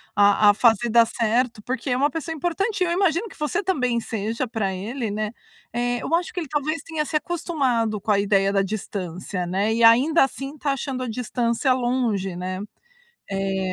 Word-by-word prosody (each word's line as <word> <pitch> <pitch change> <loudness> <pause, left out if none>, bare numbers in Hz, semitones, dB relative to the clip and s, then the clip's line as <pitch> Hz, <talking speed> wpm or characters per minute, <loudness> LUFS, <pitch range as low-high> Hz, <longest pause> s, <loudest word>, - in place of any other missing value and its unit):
a 205 +1 +5
a - - +7
fazer 230 +1 +3
dar 230 0 +6
certo, 230 0 0
porque 260 +3 -3
é 250 - +1
uma 285 +3 +3
pessoa 325 0 -4
importante. 365 +6 -1
Eu 345 - 0
imagino 360 +2 +1
que - - -16
você 300 +7 -1
também 250 -11 +1
seja 225 +3 -3
para 220 -4 -2
ele, 225 +5 -4
né, 215 +1 -2 0.4
eh, 245 0 0
eu - - -3
acho 345 +1 +1
que 360 - -2
ele 325 - -4
talvez 305 +3 -2
tenha 320 -2 -2
se 305 - -5
acostumado 270 - 0
com 210 - -1
a 200 - +4
ideia 195 -1 +2
da 195 - +3
distância, 190 -3 -4
né. 200 +5 0
E 230 +1 +1
ainda 260 +9 +6
assim 270 +1 -6
está 285 -1 -1
achando 265 -1 -4
a - - -4
distância 240 +2 0
longe, 240 -7 -1
né, 185 +1 -4 0.7
eh, 195 0 -1
240 Hz, 190 wpm, -23 LUFS, 210-295 Hz, 0.7 s, a